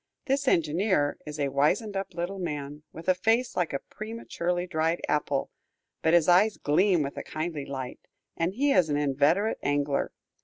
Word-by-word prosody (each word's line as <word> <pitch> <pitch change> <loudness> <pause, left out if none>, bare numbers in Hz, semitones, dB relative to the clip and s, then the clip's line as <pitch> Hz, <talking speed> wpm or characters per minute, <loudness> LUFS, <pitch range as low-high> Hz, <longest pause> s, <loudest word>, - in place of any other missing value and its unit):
This 275 0 0
engineer 165 - +2
is 150 0 -6
a 140 -1 +1
wizened 170 +10 +1
up 195 -2 -4
little 180 +3 -3
man, 150 -4 -4
with 165 - -10
a 185 - +6
face 225 +7 +1
like 175 -3 0
a 140 - 0
prematurely 180 -3 -4
dried 165 -1 0
apple, 145 -2 0 0.5
but 160 +1 +4
his 170 -3 +4
eyes 195 +5 +5
gleam 175 +2 +3
with 140 - -5
a - - -4
kindly 155 -2 -4
light, 130 -2 -5 0.4
and 175 +3 -1
he 280 +4 +2
is 180 - +4
an 145 - +1
inveterate 145 +9 +2
angler. 145 0 0
170 Hz, 175 wpm, -28 LUFS, 145-195 Hz, 0.5 s, a